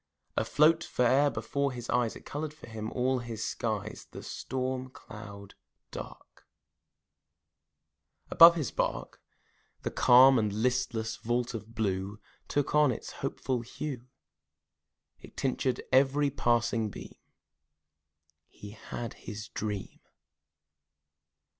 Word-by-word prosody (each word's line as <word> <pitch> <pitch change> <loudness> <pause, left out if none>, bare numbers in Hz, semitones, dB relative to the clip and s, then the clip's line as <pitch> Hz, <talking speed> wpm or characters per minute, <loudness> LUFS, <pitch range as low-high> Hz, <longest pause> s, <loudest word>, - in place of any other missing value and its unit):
Afloat 160 +2 +3
fore'er 135 +1 +3
before 140 -1 -1
his 120 -2 -7
eyes, 120 -2 +1
It - - -12
colored 150 +1 -5
for - - -12
him 110 -1 -5
all 130 +1 +1
his 115 -2 -5
skies: 110 -2 -3
The - - -9
storm 130 0 -3
cloud 100 -5 -11 0.4
dark - - -10 1.8
Above 170 +1 +9
his 155 -6 -2
bark, - - -3 0.6
The - - -2
calm 130 +1 +7
and 105 -2 0
listless 115 0 -1
vault 120 +1 -1
of 115 0 -8
blue 100 -1 -2 0.3
Took 145 -1 -1
on 150 -2 +5
its - - -6
hopeful 125 -2 -2
hue, 125 +1 -6 1.1
It - - -15
tinctured 130 -1 0
every 140 +2 +4
passing 120 -3 +1
beam - - -10 1.3
He 105 - -11
had 115 +2 -7 0.2
his 105 0 -7
dream. 105 -2 -5
120 Hz, 110 wpm, -30 LUFS, 110-135 Hz, 1.8 s, Above